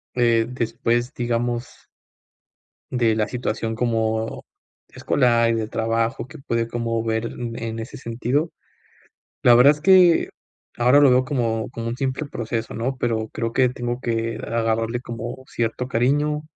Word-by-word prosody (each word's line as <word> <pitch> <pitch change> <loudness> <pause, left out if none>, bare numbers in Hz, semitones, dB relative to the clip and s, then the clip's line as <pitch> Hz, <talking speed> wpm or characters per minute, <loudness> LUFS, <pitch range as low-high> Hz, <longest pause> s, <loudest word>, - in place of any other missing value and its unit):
eh, 115 -2 +3
después, 120 +1 -1
digamos 120 -1 -1 1.2
de 120 -3 +2
la 110 -1 0
situación 115 -2 -3
como, 110 -1 -1 0.4
escolar, 120 -3 +2
y - - +1
de 110 -1 -2
trabajo 115 +1 -1
que 155 +4 -12
puede 115 -4 -2
como 115 -1 -2
ver 110 0 -1 0.3
en 115 -1 -5
ese 115 +1 -7
sentido, 125 +7 -1 0.9
la 120 - +7
verdad 130 +4 +7
es 150 - -13
que, 180 -1 +5 0.5
ahora 125 +4 +5
lo 140 -3 +6
veo 130 +1 +4
como, 115 -5 -1
como 115 -1 -5
un 115 - -3
simple 135 +2 -2
proceso, 115 -4 -4
¿no?, 125 +4 -2
pero 115 -3 -1
creo 115 -1 -3
que 130 +1 +3
tengo 120 0 -4
que 115 -2 -2
agarrarle 115 +1 -1
como 120 +1 -7
cierto 120 +2 -2
cariño 145 +5 +1
120 Hz, 145 wpm, -22 LUFS, 115-125 Hz, 1.2 s, la